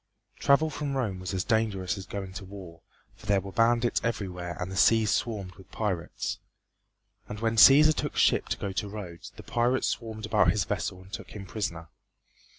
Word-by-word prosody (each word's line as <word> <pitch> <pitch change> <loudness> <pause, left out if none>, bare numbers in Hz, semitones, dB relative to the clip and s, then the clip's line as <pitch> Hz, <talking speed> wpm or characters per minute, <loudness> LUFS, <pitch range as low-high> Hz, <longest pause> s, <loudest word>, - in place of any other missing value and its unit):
Travel 150 +3 +3
from 145 -3 -3
Rome 105 -8 -2
was 90 0 -5
as 95 -2 -1
dangerous 110 -5 0
as 95 -2 -8
going 95 -2 -6
to 100 - -7
war, 95 -4 -11 0.3
for 105 - -15
there 100 -1 +3
were 95 0 -8
bandits 115 +2 +2
everywhere 90 -7 -3
and 90 +1 -4
the - - -5
seas 110 +1 +4
swarmed 100 -5 -2
with 95 -1 -16
pirates. 95 -6 -3 0.9
And 105 - -6
when 115 0 0
Cæsar 140 +8 +8
took - - -3
ship - - +3
to - - -1
go 100 - -4
to 100 +2 -3
Rhodes, 95 -5 -8
the - - -11
pirates 120 +2 +1
swarmed 110 -2 -5
about 110 - +3
his - - +2
vessel 95 0 -3
and 95 +2 -18
took - - -7
him 100 -2 -7
prisoner. 85 -6 -4
100 Hz, 190 wpm, -28 LUFS, 95-115 Hz, 0.9 s, Cæsar